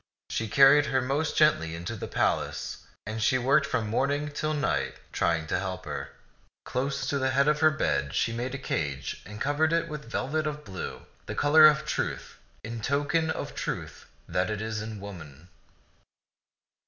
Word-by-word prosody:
She 110 - -1
carried 140 +5 +6
her 130 - +2
most 140 +5 -1
gently 85 - +3
to 115 +6 -4
the 105 - -5
palace, - - -1 0.2
and 110 +1 -4
she 130 +3 +3
worked 140 +3 +3
from 110 - -1
morning 140 +6 0
till 155 +1 -1
night, 145 -4 0 0.2
trying 85 -2 +1
to 80 - -1
help 95 -1 -4
her. - - -5 0.6
Close 135 +2 -2
to 140 0 0
the 130 0 +1
head 140 +2 +3
of 150 0 +3
her 155 0 +6
bed 70 - -1
she 115 - +1
made 125 +3 -3
a - - -3
cage 70 - -3
and 105 +1 -9
covered 145 +4 +1
it 165 0 +1
with 150 -6 -7
velvet 155 +6 -1
of 150 0 -5
blue, 95 -3 -6 0.2
the - - -4
color 155 +2 +7
of 155 0 +2
truth, 150 - -3 0.2
in 115 +1 -5
token 145 +6 +1
of - - -3
the - - -13
truth - - -5 0.2
that 90 +2 0
is 110 0 -3
in 110 -1 -6
woman. 85 -5 -10
130 Hz, 180 wpm, -28 LUFS, 105-150 Hz, 0.6 s, color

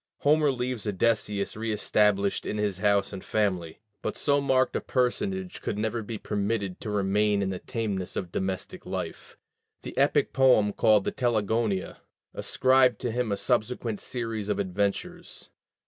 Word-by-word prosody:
Homer 150 0 +4
leaves 125 -3 -3
Odysseus 105 0 0
reëstablished 105 -2 +1
in 105 - -2
his 105 -3 -1
house 100 0 +2
and 95 - -7
family. 95 -5 -1 0.2
But - - -3
so 145 -1 +2
marked 130 -2 +2
a - - 0
personage 185 +9 -1
could 105 - -3
never 110 +2 -1
be 110 +1 -5
permitted 100 -2 -2
to - - -5
remain 105 0 +2
in 95 - -1
the 90 - -4
tameness 105 -6 -3
of 90 -3 -4
domestic 95 0 -4
life; - - -6 0.5
the - - -7
epic - - +2
poem 125 -6 +4
called 105 -2 +4
the - - -1
Telegonia 110 -4 0 0.4
ascribed 130 -2 +3
to 120 - -1
him 120 -1 -1
a 100 - 0
subsequent 110 +1 0
series 115 -4 -4
of - - 0
adventures. 100 +1 -3
105 Hz, 150 wpm, -27 LUFS, 100-120 Hz, 0.5 s, Homer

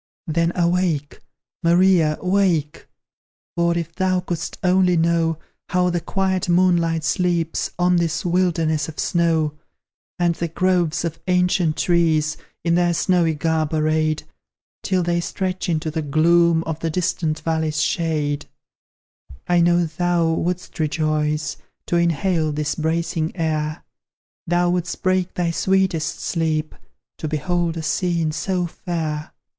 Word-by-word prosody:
Then, 165 +1 +1
awake! 170 -4 0 0.4
Maria, 170 -2 +4
wake! 180 -6 +1 0.7
For, 170 0 +1
if 165 -1 -4
thou 185 0 +1
couldst 175 -2 -4
only 180 -1 +3
know 165 -1 +2 0.3
How 180 -1 +2
the 175 -1 -1
quiet 190 +1 -1
moonlight 170 -2 +2
sleeps 170 0 0
On 180 0 +3
this 165 -1 -1
wilderness 165 -4 +1
of 155 - -10
snow, 160 -3 +1 0.6
And 175 -1 +2
the 170 +1 -3
groves 175 -1 +1
of 165 -1 -4
ancient 180 -3 +2
trees, 160 -3 +2 0.3
In 170 - +1
their 175 0 +2
snowy 170 -3 +2
garb 160 0 0
arrayed, 155 0 +1 0.6
Till 185 -2 0
they 170 0 0
stretch 185 +1 -3
into 155 -1 -1
the 160 +1 -2
gloom 165 +3 +3
Of 160 -1 -4
the 165 - -2
distant 160 -2 -1
valley's 160 -1 -1
shade; 155 -2 -1 1.0
I 175 -1 +3
know 175 0 +3
thou 170 0 0
wouldst 180 +2 -3
rejoice 150 -1 0 0.3
To 175 - 0
inhale 170 -1 +1
this 150 0 -1
bracing 160 0 -1
air; 155 -2 -2 0.6
Thou 175 +1 +2
wouldst 175 -1 -3
break 185 -1 +1
thy 175 -2 0
sweetest 190 -2 0
sleep 160 -2 -1 0.5
To 155 - -3
behold 165 +2 -1
a 160 - -4
scene 165 +1 0
so 180 +3 -1
fair. 160 -3 -4
170 Hz, 130 wpm, -21 LUFS, 155-175 Hz, 1.0 s, Maria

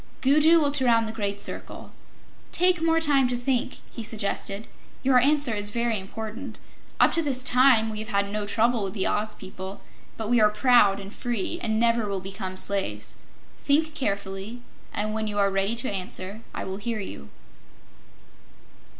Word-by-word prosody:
Gugu 305 +5 +5
looked 290 -3 +1
around 230 -3 +3
the 220 - -4
great 205 -2 -3
circle. - - -3 0.6
"Take 360 -1 +3
more 325 0 +3
time 285 -5 +3
to 245 0 -1
think," 245 0 -1
he - - -7
suggested. 210 -1 -2 0.4
"Your 260 -1 +5
answer 285 -1 +3
is 205 -1 0
very 235 -1 0
important. 220 +5 -7 0.4
Up - - +5
to 335 - +2
this 265 -5 0
time 250 -3 +5
we 215 - -5
have 215 - -5
had 200 -3 0
no 210 0 -3
trouble 230 +2 +2
with 195 -1 -3
the 190 - 0
Oz 210 0 -1
people, 190 +1 -8 0.4
but 220 - -4
we 240 0 +3
are 210 - +6
proud 210 -3 +4
and 200 +1 -9
free, 240 - -3
and 220 -1 0
never 230 -2 +2
will 200 -1 -2
become 190 0 -6
slaves. 200 0 -1 0.4
Think 310 +2 +2
carefully, 200 -3 -3 0.3
and 215 +1 -2
when 220 0 -2
you 205 -1 -4
are 200 -1 +3
ready 195 +3 0
to 235 0 -2
answer, 190 +2 -3
I - - -5
will 190 0 -5
hear 220 +2 -3
you." 70 - -8
220 Hz, 175 wpm, -25 LUFS, 200-255 Hz, 0.6 s, are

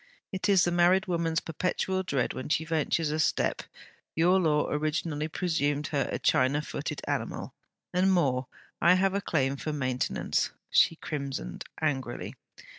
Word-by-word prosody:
It 190 +1 -2
is 190 -3 +5
the 175 - +2
married 175 +2 +4
woman's 165 -3 0
perpetual 185 +3 -1
dread 140 -9 -1
when 130 - -6
she 160 +1 +1
ventures 160 0 0
a 155 - -1
step. 155 - +1 0.5
Your 180 +4 +4
Law 150 -4 +2
originally 150 0 -1
presumed 155 -3 0
her 140 -3 0
a - - -1
China 140 +4 +2
footed - - -4
animal. - - -3 0.4
And 185 +2 +3
more, 135 -8 +2 0.3
I 170 +2 +6
have 190 +1 +2
a 200 - 0
claim 140 -6 0
for 155 - -3
maintenance.' 130 -3 -1 0.2
She 165 - +5
crimsoned 140 - -5
angrily. 145 -4 -2
155 Hz, 150 wpm, -28 LUFS, 145-175 Hz, 0.5 s, I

